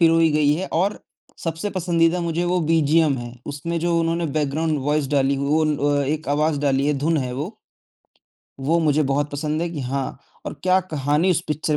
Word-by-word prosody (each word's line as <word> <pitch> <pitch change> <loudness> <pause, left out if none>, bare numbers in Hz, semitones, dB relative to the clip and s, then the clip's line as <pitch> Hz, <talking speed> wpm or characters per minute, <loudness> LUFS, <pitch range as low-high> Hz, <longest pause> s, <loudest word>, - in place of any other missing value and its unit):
पिरोई 165 -1 +5
गई 150 -1 +3
है 185 +5 -3
और 190 +6 +1 0.5
सबसे 165 +5 -2
पसंदीदा 175 -2 +1
मुझे 170 0 -1
वो 180 +1 +1
बीजीएम 160 -2 +3
है, 120 0 -7
उसमें 155 +4 -3
जो 170 0 +1
उन्होंने 165 +1 0
बैकग्राउन्ड 155 +1 0
वॉइस 145 -1 +1
डाली 140 -1 +2
वो 145 +3 +1
न 155 -1 +1
अ, 145 0 +1
एक 155 0 -2
आवाज़ 150 0 +1
डाली 140 -1 +1
है, 150 - +3
धुन 160 +4 +1
है 130 -4 -2
वो। 155 - -5 1.0
वो 160 +5 +2
मुझे 155 -1 +2
बहुत 145 +1 0
पसंद 150 +2 -2
है 170 - -1
कि 160 -4 -5
हाँ, 135 +1 -3 0.3
और - - -4
क्या 185 +1 +4
कहानी 155 0 0
उस 170 - +2
पिक्चर 150 0 0
155 Hz, 195 wpm, -22 LUFS, 145-165 Hz, 1.0 s, पिरोई